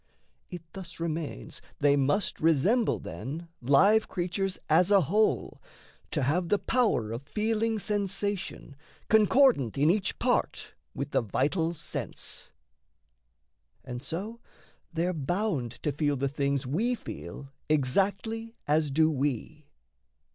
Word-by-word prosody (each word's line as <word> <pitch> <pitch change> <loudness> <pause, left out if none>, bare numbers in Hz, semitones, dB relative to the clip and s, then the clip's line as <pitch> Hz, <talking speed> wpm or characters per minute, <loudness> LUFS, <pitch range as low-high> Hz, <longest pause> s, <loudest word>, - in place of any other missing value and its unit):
It 175 -3 -7
thus 185 -3 -9
remains 160 - -4 0.2
they 145 -1 +4
must 145 +8 +1
resemble, 165 - +3
then, 135 - -7
Live 195 - +5
creatures 185 +1 -2
as 170 +4 +4
a 200 -2 +6
whole, 210 +8 +1 0.5
to 150 - -1
have 170 +6 +1
the 205 - +4
power 210 - +1
Of 115 +2 -4
feeling 220 +7 0
sensation 200 -5 -3 0.3
concordant 220 - +4
in 150 +4 +5
each 200 +1 -1
part - - 0 0.2
With - - -4
the - - +2
vital 160 - 0
sense; - - -5 1.4
and 125 -2 -6
so 195 - -5 0.5
they're 175 +2 0
bound 160 - -1
to 150 - +1
feel 145 0 0
The 140 +2 0
things 140 -1 -1
we 215 - 0
feel 140 - -8 0.2
exactly 200 - 0
as 150 0 +2
do 155 +3 +4
we. 145 +1 -3
165 Hz, 120 wpm, -28 LUFS, 140-205 Hz, 1.4 s, a